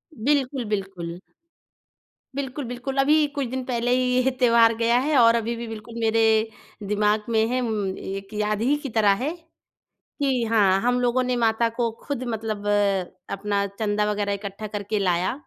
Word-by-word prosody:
बिल्कुल, 265 0 0
बिल्कुल। 190 -4 -4 1.2
बिल्कुल, 275 0 -4
बिल्कुल। 250 +3 -5
अभी 300 +2 +4
कुछ 280 -2 -1
दिन 260 +2 -4
पहले 245 -1 -1
ही 255 - +2 0.2
ये 265 - +2
त्योहार 230 -2 +5
गया 235 +1 +3
है 290 +1 +1
और 230 -1 +6
अभी 230 +1 -1
भी 235 0 -6
बिल्कुल 225 +1 -9
मेरे, 220 0 +3 0.4
दिमाग 210 +1 +1
में 220 -1 +3
है, 255 +2 0
म्म 210 -5 -2
एक 195 +1 -7
याद 210 0 -1
ही 265 +5 +3
की 275 - -3
तरह 205 -2 +5
है। 300 - 0 0.9
कि 260 -4 +1
हाँ, 200 -4 +3
हम 245 +1 +1
लोगों 245 +1 +2
ने 250 0 0
माता 230 0 +2
को 235 -2 +1
खुद 275 -3 -3
मतलब 215 -2 -4
अ, 200 -2 +2 0.3
अपना 200 0 -1
चँदा 210 -1 +1
वग़ैरह 205 -1 -1
इकट्ठा 200 +1 -6
करके 205 0 -3
लाया 180 0 +1
225 Hz, 170 wpm, -24 LUFS, 205-245 Hz, 1.2 s, और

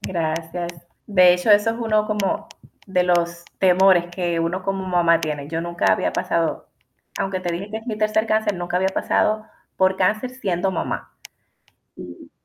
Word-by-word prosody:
Gracias. 170 0 -3 0.3
De 180 -4 +6
hecho, 180 +5 0
eso 210 +2 +5
es 225 - -4
uno 215 -2 +1
como 210 -3 -2 0.4
de 185 -2 +1
los 170 -1 0
temores 185 -1 +4
que 175 -2 -2
uno 180 +3 -2
como 195 -1 -3
mamá 170 -2 +3
tiene. 150 -2 -4
Yo 165 +1 -2
nunca 170 +1 +1
había - - 0
pasado, - - -1 0.5
aunque 195 -1 -2
te 175 -2 -3
dije 195 +5 -5
que 220 - -4
es 225 - -16
mi 215 -2 -4
tercer 215 +1 +1
cáncer, 215 -2 +1
nunca 175 0 -3
había 190 +1 +2
pasado 215 +2 0 0.3
por 190 0 +2
cáncer 215 +7 0
siendo 195 -7 -2
mamá. 180 - -4 0.8
Y 90 -1 -11
185 Hz, 170 wpm, -22 LUFS, 170-210 Hz, 0.8 s, De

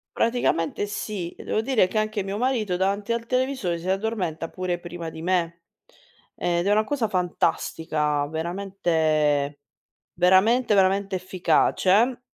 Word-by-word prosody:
Praticamente 205 -6 0
sì. 205 -4 -5
Devo 215 - -2
dire 225 -6 +2
che 215 - -4
anche 215 -1 0
mio 195 +1 -4
marito 230 -7 0
davanti 200 +4 0
al 235 0 -3
televisore 255 -9 -1
si 180 - -5
addormenta 190 -5 -2
pure 180 0 -3
prima 175 -1 -7
di 160 +1 -9
me, 170 -2 0 0.7
ed 175 +2 0
è - - +3
una 215 +1 +4
cosa 245 -2 -1
fantastica. 160 -5 -1
Veramente 160 -4 0 0.5
veramente, 205 +7 +4
veramente 195 0 +2
efficace. 190 +5 +2
185 Hz, 125 wpm, -24 LUFS, 170-215 Hz, 0.7 s, una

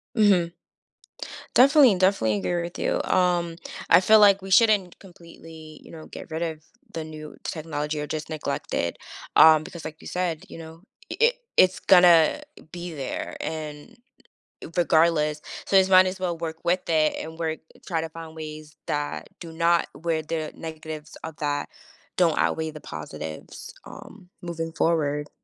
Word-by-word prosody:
Mhm. 190 -6 +3 1.0
Definitely, 270 -3 +6
definitely 180 - +2
agree 175 - -1
with 170 0 -6
you, - - 0
um, 175 -2 +1 0.3
I - - +7
feel 215 +3 +6
like 200 -2 +6
we 190 0 -8
shouldn't 205 -3 +3
completely, 165 -4 -14
you - - -15
know, 160 -1 -11
get - - -10
rid 160 +1 -4
of 160 -2 -3 0.3
the 165 - -4
new 155 -1 -10
technology 150 -2 -4
or 150 - -5
just 155 +1 -5
neglect 155 -1 -4
it, 85 - -1 0.4
um, 155 -1 +7
because, 170 -2 -10
like 155 - -8
you - - -10
said, 180 -2 -2
you - - -10
know, 165 0 -11 0.3
i - - -3
i 475 +1 +5 0.2
it's 185 0 +4
gonna 175 - +5 0.3
be 175 -1 -7
there 135 -3 -5
and 150 -2 -6 0.8
regardless, 160 -3 +2 0.2
so 195 - +3
as 190 0 +4
might 185 0 +7
as 185 +1 -4
well 180 -2 -2
work 160 -1 -5
with 175 +1 0
it 155 -2 +3
and 160 +1 -9
work 160 -1 -2 0.3
try 165 -3 -1
to 160 - -5
find 160 0 -10
ways 155 -1 -9
that 145 0 -3
do 165 - -9
not 170 +1 +2
where 165 0 -2
the 155 0 -4
negatives 155 -1 -8
of 160 -1 -7
that 145 -1 -2 0.5
don't 170 -4 +3
outweigh 160 -1 0
the 155 - -11
positives, 75 0 -8
um, 180 - -13
moving 165 -1 -5
forward. 150 -3 0
165 Hz, 165 wpm, -25 LUFS, 155-180 Hz, 1.0 s, I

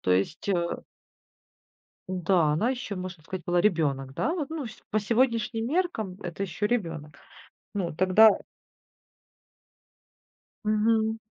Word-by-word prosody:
То 90 - -1
есть, 100 - 0
э 170 -3 0 1.3
Да, 180 -4 +2
она, 170 +11 +1
еще 245 -6 -4
можно 180 -3 -6
сказать, 180 +2 -6
была 175 0 +3
ребенок, 145 -9 +1
да, 325 - 0
вот, 310 -6 -3
ну, 315 -5 -4 0.2
по 215 - +2
сегодняшним 230 0 +1
меркам 250 - -1
это 175 +2 -5
еще 200 +2 -1
ребенок. 165 -10 -2 0.6
Ну, 185 -4 -1
а, - - -8
тогда 185 +5 +7 2.4
Мгм. 220 +1 +2
195 Hz, 120 wpm, -27 LUFS, 170-225 Hz, 2.4 s, тогда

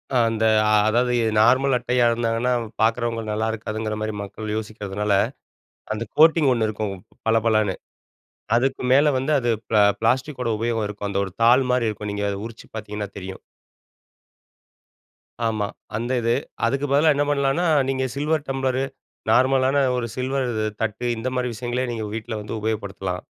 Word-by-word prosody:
அ - - +5
அந்த 110 0 0 0.4
அதாவது, 125 +2 +2
எ - - +1
நார்மல் 130 +4 +4
அட்டையா 125 0 +1
இருந்தாங்கன்னா, 115 +1 0
அவு 115 - -5
பாக்குறவங்களு 115 -1 0
நல்லா 110 +1 -1
இருக்காதுங்கிற 110 0 -4
மாரி 110 0 -2
மக்கள் 105 +1 -6
யோசிக்கிறதுனால, 105 -2 -3 0.8
அந்த 110 +2 -3
கோட்டிங் 160 -2 +6
ஒண்ணு 115 -3 +1
இருக்கும். 105 -2 -3 0.3
பள 110 - +4
பளன்னு. 110 -4 +2 0.8
அதுக்கு 130 +2 0
மேலே 145 +3 +5
வந்து 135 +4 -1
அது 120 -2 0 0.2
ப்ள 110 - +1 0.2
பிளாஸ்டிக்கோட 125 +2 0
உபயோகம் 115 -1 -1
இருக்கும். 105 0 -5
அந்த 100 0 0
ஒரு 95 - -8
தாள் 125 +3 +6
மாரி 125 -2 +2
இருக்கும். 105 -1 -4
நீங்க 100 0 -2
அதை 100 - -3
உரிச்சி 115 0 -11
பாத்தீங்கன்னா 105 -1 -5
தெரியும். 95 0 -7 2.1
ஆமா. 110 -2 -1 0.3
அந்த 120 +3 -3
இது. 115 0 +2 0.3
அதுக்கு 135 +4 0
பதிலா 150 +2 +5
என்ன 145 - +2
பண்ணலான்னா, 140 +4 +1 0.2
நீங்க 130 -1 0
சில்வர் 150 +1 0
டம்ப்ளரு, 135 -1 0 0.5
நார்மலான 130 +2 +3 0.2
ஒரு 120 - -2
சில்வர் 130 0 -1
இது 110 -1 -1 0.2
தட்டு, 110 +2 -3
இந்த 120 +3 -2
மாரி 125 -1 0
விஷயங்களே 125 +3 -2
நீங்க 110 -2 -4
வீட்ல 115 +1 -5
வந்து 105 - -7
உபயோகப்படுத்தலாம். 100 -4 -3
115 Hz, 155 wpm, -23 LUFS, 110-130 Hz, 2.1 s, கோட்டிங்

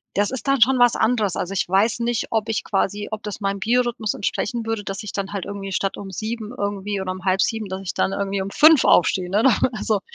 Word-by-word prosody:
Das 205 +2 +1
ist 265 +2 -6
dann 275 -3 +2
schon 260 +3 +5
was 245 -2 +5
anderes. 220 -5 +1
Also 185 +2 -3
ich 195 - -1
weiß 210 +5 +2
nicht, 235 -1 -1
ob 225 -1 0
ich 220 - -1
quasi 205 +1 -1
ob 215 0 -5
das 210 0 -6
meinem 195 0 -1
Biorhythmus 235 0 0
entsprechen 230 +3 -2
würde, 225 -2 -2
dass 195 +1 -5
ich 210 - -6
dann 200 0 -4
halt 200 -3 -3
irgendwie 195 -1 -6
statt 195 +1 -1
um 195 -1 -8
7:00 220 +3 -5
irgendwie 200 0 -3
oder 185 -1 -3
um 185 0 -8
7:30, 195 +3 +1
dass 190 +1 -5
ich 185 - -5
dann 190 - 0
irgendwie 200 0 -2
um 195 - -4
5:00 310 0 +6
aufstehe, 180 +1 +3
ne 200 +3 +2
oder 250 -2 +5
oder 240 -4 0
so? 215 -3 +1
205 Hz, 250 wpm, -22 LUFS, 195-225 Hz, -, 5:00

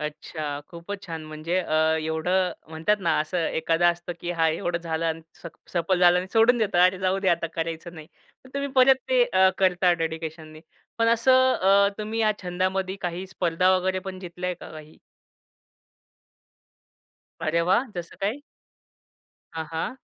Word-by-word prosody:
अच्छा. 150 -1 -5
खूपच 185 +4 -8
छान. 160 -2 -6
म्हणजे 155 +3 -3
अ, 155 - -3 0.3
एवढं 175 +4 0 0.2
म्हणतात 160 +7 0
ना 170 -3 +1
असं 165 +1 -1
एखादा 165 +2 +2
असतं, 175 +1 -2
की 175 - -4
हा 165 -2 +2
एवढं 170 +2 -1
झालं 165 -1 -3
अन् 160 0 -3 0.2
स - - -7 0.3
सफल 175 +1 +1
झालं 180 0 +5
आणि 185 - -3
सोडून 230 +2 +5
देतात. 200 -5 +1
अरे! 185 0 -1
जाऊ 190 0 0
दे 195 - 0
आता 170 -1 +1
करायचं 165 +1 -4
नाही. 155 -2 -10 0.4
पण 260 - -16
तुम्ही 280 0 -2
परत 265 0 +7
ते - - +4
अ, 190 - +4
करता 180 -1 +3
डेडिकेशननी. 160 -1 -5 0.4
पण 230 - +3
असं 255 +3 +4
अ, 200 +1 +4
तुम्ही 215 +2 -3
या 215 -1 +3
छंदामध्ये 185 +1 -1
काही 180 +1 -4
स्पर्धा 180 -1 +1
वगैरे 185 +1 -1
पण 185 -1 -7
जितल्या 180 0 -5
आहे 180 - -2
का - - -10
काही? 155 0 -12 2.4
अरे 165 +1 +1
वाह! 190 +9 +2
जसं 175 -1 -7
काही? 215 +8 -1 1.1
हां, 160 0 -4
हां. 165 +10 -3
180 Hz, 165 wpm, -25 LUFS, 165-195 Hz, 2.4 s, परत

